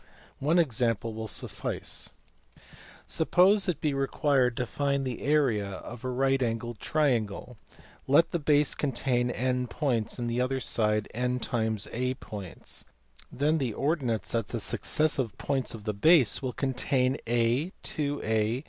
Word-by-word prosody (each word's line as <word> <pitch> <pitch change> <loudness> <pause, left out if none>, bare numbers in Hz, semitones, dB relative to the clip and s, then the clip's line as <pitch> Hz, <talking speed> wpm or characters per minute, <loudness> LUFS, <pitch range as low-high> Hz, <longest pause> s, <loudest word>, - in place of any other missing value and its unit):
One 155 +5 +2
example 115 - +1
will 110 0 -5
suffice. - - -4 1.0
Suppose 195 +2 +3
it 165 -4 -1
be 150 -2 0
required 135 -2 +1
to 125 - 0
find 140 +2 -1
the 125 -3 -4
area 135 -9 +2
of 110 +5 -8
a 130 - -2
right 135 +1 +1
angled 115 -1 -2
triangle. 125 -6 0 0.5
Let 145 +5 +5
the 170 - 0
base 145 -1 +3
contain 125 -3 0
n 125 0 0
points 120 -5 -1
and 120 -1 -2
the 120 +1 0
other 130 +1 0
side 105 -3 +1
na 125 +2 0 0.8
points, 100 -6 -8 0.5
then 150 +4 +1
the 120 -6 -2
ordinates 135 -7 -1
at 115 -4 0
the - - -4
successive 140 -7 0
points 135 -4 -2
of 110 - -10
the 105 0 -2
base 135 - +4
will 130 -2 -3
contain 130 0 +1
a, 120 +8 +1
2a 120 -6 0
125 Hz, 140 wpm, -28 LUFS, 115-145 Hz, 1.0 s, Let